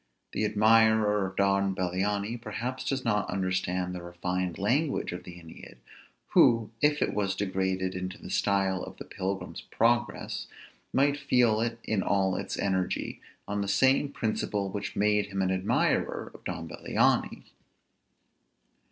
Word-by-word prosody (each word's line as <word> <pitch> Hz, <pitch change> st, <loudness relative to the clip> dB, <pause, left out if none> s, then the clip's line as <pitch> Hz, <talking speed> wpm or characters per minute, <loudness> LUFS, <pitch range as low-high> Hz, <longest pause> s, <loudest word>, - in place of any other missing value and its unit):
The 110 Hz, -, -1 dB
admirer 110 Hz, -1 st, +4 dB
of 95 Hz, -, -9 dB
Don 100 Hz, -1 st, +2 dB
Bellianis 100 Hz, +5 st, -1 dB
perhaps 120 Hz, +4 st, -4 dB
does 135 Hz, -1 st, -2 dB
not 105 Hz, -3 st, +1 dB
understand 95 Hz, -1 st, -1 dB
the 90 Hz, -, -5 dB
refined 90 Hz, 0 st, -3 dB
language 135 Hz, +9 st, 0 dB
of 90 Hz, -, -7 dB
the 90 Hz, -, -9 dB
Æneid, 85 Hz, -7 st, -12 dB, 0.5 s
who, 115 Hz, -2 st, +4 dB
if 150 Hz, 0 st, +3 dB
it -, -, -1 dB
was 100 Hz, -2 st, 0 dB
degraded 95 Hz, -1 st, -1 dB
into 95 Hz, +2 st, -5 dB
the -, -, -9 dB
style 95 Hz, -2 st, +1 dB
of -, -, -8 dB
the -, -, -8 dB
"Pilgrim's 95 Hz, -1 st, -4 dB
Progress," 120 Hz, 0 st, 0 dB, 0.4 s
might 140 Hz, +2 st, +3 dB
feel 125 Hz, -6 st, +3 dB
it 115 Hz, 0 st, -1 dB
in 110 Hz, -3 st, 0 dB
all 95 Hz, -1 st, +1 dB
its -, -, -4 dB
energy, 95 Hz, -2 st, -1 dB, 0.3 s
on 100 Hz, 0 st, -2 dB
the 100 Hz, -, -2 dB
same 130 Hz, +7 st, +3 dB
principle 105 Hz, -5 st, -2 dB
which 100 Hz, 0 st, -4 dB
made 105 Hz, 0 st, +2 dB
him 95 Hz, -1 st, -2 dB
an 95 Hz, -, +1 dB
admirer 95 Hz, +1 st, 0 dB
of -, -, -14 dB
Don 85 Hz, -2 st, -4 dB
Bellianis. -, -, +1 dB
100 Hz, 145 wpm, -28 LUFS, 95-110 Hz, 0.5 s, admirer